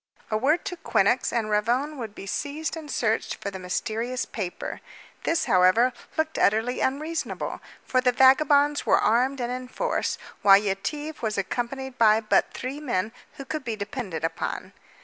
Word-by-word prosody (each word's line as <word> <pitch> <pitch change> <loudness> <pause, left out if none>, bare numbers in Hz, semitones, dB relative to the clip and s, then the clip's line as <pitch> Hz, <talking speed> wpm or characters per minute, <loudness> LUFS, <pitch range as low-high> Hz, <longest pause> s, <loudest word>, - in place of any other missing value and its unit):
A - - +1
word 295 - +1
to 365 -3 -4
Quinnox 250 - +2
and 220 -3 -1
Ravone 240 +8 +1
would 220 -3 -6
be - - -8
seized 295 +10 -3
and 315 -2 -8
searched 225 -4 0
for 200 - -5
the 190 - -7
mysterious 225 +7 -2
paper. 190 -5 -5 0.4
This, 330 - +1
however, 185 +8 +4 0.2
looked 315 0 0
utterly 225 +4 +2
unreasonable, 310 +5 -2 0.2
for 255 - +2
the 250 -1 +3
vagabonds 285 +3 +4
were - - +4
armed 255 +5 +2
and 240 0 -2
in 255 0 -5
force, - - -1 0.2
while 195 -1 +8
Yetive 290 +11 -3
was 215 -2 -1
accompanied 250 +6 -3
by 220 -1 +6
but 215 -1 +2
three 265 +3 -5
men 225 -8 -1 0.2
who 275 - -9
could 310 +1 -4
be 230 -4 -3
depended 205 - -5
upon. 165 0 -3
250 Hz, 165 wpm, -26 LUFS, 215-285 Hz, 0.4 s, while